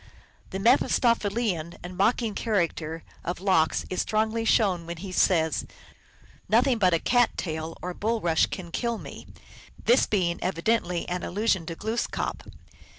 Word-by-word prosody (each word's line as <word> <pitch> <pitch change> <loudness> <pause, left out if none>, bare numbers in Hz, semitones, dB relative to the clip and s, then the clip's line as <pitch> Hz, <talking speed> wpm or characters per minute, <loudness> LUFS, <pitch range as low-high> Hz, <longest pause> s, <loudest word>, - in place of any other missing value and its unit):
The 190 - -4
Mephistophelian 215 - +2
and 180 +1 -7
mocking 220 +3 +1
character 170 -7 -1 0.2
of 175 0 -3
Lox 185 -5 +2
is 185 - 0
strongly 220 +1 0
shown 185 -7 +2
when 170 0 -5
he 190 +2 -7
says, 160 -4 +2 0.4
" - - -27
Nothing 240 +3 +3
but 180 -4 +4
a - - +3
cat 245 +7 +2
tail 160 -1 -4
or 180 0 -3
bulrush 205 -6 +1
can 175 -3 -7
kill 235 +4 -1
me," - - -10 0.6
this 240 +3 +4
being 180 -5 0
evidently 180 -1 0
an 180 0 -2
allusion 195 -3 0
to 165 - -4
Glooskap. 220 +6 -3
190 Hz, 145 wpm, -26 LUFS, 170-225 Hz, 0.6 s, but